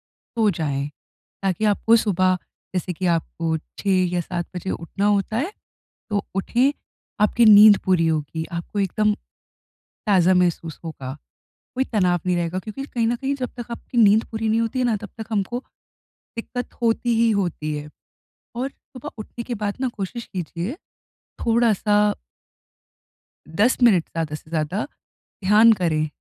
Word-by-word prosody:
सो 225 Hz, -2 st, -1 dB
जाएँ 145 Hz, -6 st, -2 dB, 0.6 s
ताकि 195 Hz, +2 st, 0 dB
आपको 215 Hz, +2 st, +4 dB
सुबह, 185 Hz, -4 st, +2 dB, 0.4 s
जैसे 180 Hz, 0 st, -1 dB
कि 185 Hz, +3 st, -4 dB
आपको 165 Hz, -1 st, 0 dB, 0.2 s
6 190 Hz, -2 st, +2 dB
या 175 Hz, -, +1 dB
7 175 Hz, +1 st, -4 dB
बजे 180 Hz, +1 st, -4 dB
उठना 195 Hz, +4 st, -3 dB
होता 205 Hz, +1 st, +1 dB
है, 310 Hz, -, -1 dB, 0.6 s
तो 205 Hz, -1 st, 0 dB
उठें। 240 Hz, +8 st, +2 dB, 0.5 s
आपकी 220 Hz, +3 st, +4 dB
नींद 210 Hz, -1 st, +9 dB
पूरी 180 Hz, -3 st, +3 dB
होगी, 160 Hz, 0 st, -1 dB
आपको 170 Hz, +4 st, -4 dB
एकदम 210 Hz, +2 st, +1 dB, 0.9 s
ताज़ा 185 Hz, -3 st, +5 dB
महसूस 175 Hz, -3 st, 0 dB
होगा, 135 Hz, -5 st, -6 dB, 0.6 s
कोई 260 Hz, -, +2 dB
तनाव 180 Hz, -7 st, +1 dB
नहीं 180 Hz, -1 st, +2 dB
रहेगा 170 Hz, +1 st, -1 dB
क्योंकि 215 Hz, +7 st, -7 dB
कहीं 235 Hz, -5 st, -1 dB
न 240 Hz, -, +1 dB
कहीं 270 Hz, +3 st, -2 dB
जब 255 Hz, -2 st, -3 dB
तक 240 Hz, 0 st, -7 dB
आपकी 235 Hz, +1 st, -6 dB
नींद 215 Hz, 0 st, +6 dB
पूरी 220 Hz, 0 st, -1 dB
नहीं 225 Hz, +1 st, +2 dB
होती 230 Hz, +3 st, -1 dB
है 250 Hz, -, +2 dB
ना, 235 Hz, -2 st, +2 dB
तब 210 Hz, 0 st, -9 dB
तक 220 Hz, -, -5 dB
हमको 215 Hz, +3 st, -1 dB, 0.8 s
दिक़्क़त 245 Hz, +2 st, -5 dB
होती 235 Hz, 0 st, +2 dB
ही 230 Hz, 0 st, +4 dB
होती 175 Hz, -7 st, -1 dB
है। 150 Hz, 0 st, -8 dB, 0.7 s
और 255 Hz, +3 st, -1 dB
सुबह 255 Hz, -2 st, -11 dB
उठने 220 Hz, +2 st, -7 dB
के 245 Hz, -, -3 dB
बाद 205 Hz, -2 st, -2 dB
ना 260 Hz, -, +1 dB
कोशिश 220 Hz, +4 st, -4 dB
कीजिए, 175 Hz, -, -3 dB, 0.7 s
थोड़ा-सा 210 Hz, -3 st, +3 dB, 1.4 s
10 205 Hz, +10 st, +2 dB
मिनट 195 Hz, -9 st, +5 dB
ज़्यादा 160 Hz, -2 st, -4 dB
से 155 Hz, +1 st, -9 dB
ज़्यादा 165 Hz, +5 st, -1 dB, 0.6 s
ध्यान 215 Hz, +4 st, +7 dB
करें, 165 Hz, -6 st, +1 dB
205 Hz, 155 wpm, -23 LUFS, 175-230 Hz, 1.4 s, नींद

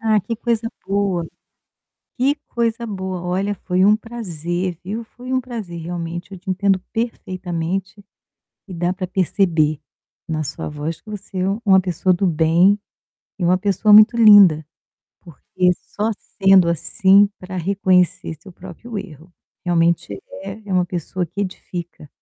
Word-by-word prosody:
Ah 220 Hz, -2 st, +2 dB
que 230 Hz, +5 st, -4 dB
coisa 230 Hz, 0 st, -1 dB, 0.2 s
boa, 195 Hz, -4 st, 0 dB, 0.9 s
que 275 Hz, +4 st, +2 dB
coisa 235 Hz, 0 st, -1 dB
boa. 190 Hz, -4 st, -5 dB
Olha, 190 Hz, +3 st, -1 dB
foi 185 Hz, +1 st, +1 dB
um 210 Hz, +1 st, +6 dB
prazer, 180 Hz, -6 st, -4 dB
viu. 215 Hz, +5 st, -4 dB
Foi 250 Hz, +3 st, -10 dB
um 260 Hz, -, +2 dB
prazer 220 Hz, -9 st, -7 dB
realmente. 175 Hz, +2 st, -5 dB
Eu 190 Hz, -, -8 dB
te 190 Hz, +2 st, -9 dB
entendo 190 Hz, 0 st, +2 dB
perfeitamente. 190 Hz, -3 st, -4 dB, 0.7 s
E 185 Hz, -, -7 dB
dá 175 Hz, +1 st, 0 dB
para 185 Hz, 0 st, -4 dB
perceber 170 Hz, -5 st, +1 dB, 0.5 s
na 155 Hz, -1 st, -2 dB
sua 145 Hz, 0 st, -5 dB
voz 150 Hz, +2 st, -5 dB
que -, -, -21 dB
você 205 Hz, -2 st, -7 dB
é 185 Hz, -, 0 dB, 0.2 s
uma 190 Hz, -2 st, +6 dB
pessoa 185 Hz, 0 st, 0 dB
do 185 Hz, +2 st, +1 dB
bem, 170 Hz, +4 st, +4 dB, 0.6 s
e 180 Hz, -, -2 dB
uma 180 Hz, +2 st, +3 dB
pessoa 205 Hz, +2 st, +1 dB
muito 215 Hz, +3 st, +8 dB
linda, 205 Hz, -9 st, +7 dB, 0.6 s
porque 180 Hz, +2 st, -1 dB
só 210 Hz, +5 st, -4 dB, 0.3 s
sendo 190 Hz, -2 st, +6 dB
assim 195 Hz, +4 st, +4 dB
para 185 Hz, 0 st, -8 dB
reconhecer 185 Hz, -2 st, +1 dB
seu 195 Hz, -, -13 dB
próprio 190 Hz, +6 st, -10 dB
erro. 175 Hz, -3 st, -9 dB, 0.3 s
Realmente 170 Hz, -, 0 dB, 0.2 s
é 200 Hz, 0 st, -7 dB
uma 180 Hz, -1 st, +3 dB
pessoa 175 Hz, +1 st, -3 dB
que 200 Hz, -, -6 dB
edifica. 175 Hz, -5 st, -6 dB
185 Hz, 145 wpm, -20 LUFS, 175-205 Hz, 0.9 s, muito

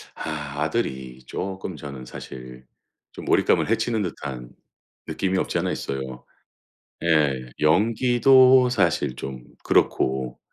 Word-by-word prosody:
아. 75 Hz, -2 st, -5 dB
아들이 65 Hz, -, -3 dB
쪼끔 95 Hz, +1 st, -5 dB
저는 70 Hz, -3 st, -8 dB
사실 65 Hz, 0 st, -10 dB, 0.5 s
좀 -, -, -10 dB
몰입감을 -, -, +2 dB
해치는 115 Hz, -1 st, +1 dB
듯한 65 Hz, -8 st, -6 dB, 0.6 s
느낌이 95 Hz, -1 st, -1 dB
없지 -, -, 0 dB
않아 -, -, -1 dB
있어요. 65 Hz, -1 st, -5 dB, 0.8 s
예. 70 Hz, -6 st, +2 dB
연기도 125 Hz, -, +5 dB
사실 85 Hz, -, +1 dB
좀 65 Hz, 0 st, -7 dB, 0.2 s
그렇고 65 Hz, -1 st, +1 dB
75 Hz, 230 characters per minute, -24 LUFS, 65-105 Hz, 0.8 s, 연기도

